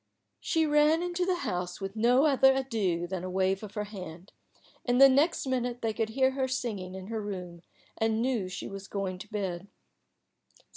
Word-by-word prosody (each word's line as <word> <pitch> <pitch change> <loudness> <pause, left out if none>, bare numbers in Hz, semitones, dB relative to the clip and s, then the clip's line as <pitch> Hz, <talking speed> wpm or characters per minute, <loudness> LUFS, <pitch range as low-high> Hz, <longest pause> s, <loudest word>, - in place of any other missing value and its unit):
She 325 -1 +1
ran 300 +2 +4
into 355 0 -1
the 370 - +2
house 180 0 -3
with 195 +1 -5
no 245 +5 +4
other 265 -2 +5
adieu 215 -10 -1
than 180 0 -4
a 185 - -4
wave 190 +1 +1
of 210 0 -9
her 210 - -1
hand, 185 -3 -9 0.5
and 245 0 +1
the 275 - +10
next 285 +6 +2
minute 245 -2 -2
they 225 -1 0
could 220 +1 -1
hear 260 +3 +2
her 265 0 -1
singing 210 -8 -3
in 190 -1 -7
her 220 +1 -4
room, 180 -4 -6 0.4
and 225 0 +1
knew 235 -6 0
she 185 - -6
was 195 0 -8
going 190 -2 -3
to 200 - -9
bed. 190 -3 -3
220 Hz, 190 wpm, -29 LUFS, 190-260 Hz, 0.5 s, the